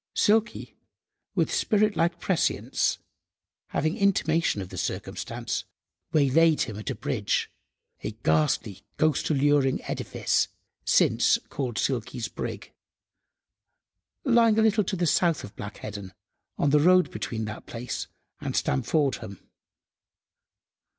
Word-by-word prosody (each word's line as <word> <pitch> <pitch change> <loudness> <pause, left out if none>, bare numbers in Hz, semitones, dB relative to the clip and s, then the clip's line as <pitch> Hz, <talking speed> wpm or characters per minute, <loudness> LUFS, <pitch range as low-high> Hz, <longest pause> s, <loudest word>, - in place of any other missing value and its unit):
Silky, 220 +2 +1 0.6
with - - +1
spirit–like 200 -6 +2
prescience, 185 -2 0 0.7
having 155 +3 -1
intimation 165 - +2
of 95 -2 -6
the - - -9
circumstance, - - -3 0.5
waylaid 155 +2 +4
him 105 -3 -6
at 110 - -5
a - - -2
bridge—a - - -4
"ghastly, 80 +6 +1 0.2
ghost–alluring 145 -3 +2
edifice," - - 0 0.4
since - - +4
called 125 -5 -3
"Silky's 120 -2 -2
Brig," - - -6 1.5
lying 235 -4 +4
a 220 - +4
little 215 -1 +3
to 195 - -2
the 175 -1 0
south 165 +1 +2
of 100 - -10
Black 105 0 -7
Heddon, 100 -3 -7 0.4
on 145 - +2
the 150 - +5
road 180 +4 +5
between 110 -2 -4
that 110 +1 -8
place 120 0 -5 0.3
and - - -4
Stamfordham. 110 - 0
145 Hz, 110 wpm, -26 LUFS, 110-180 Hz, 1.5 s, the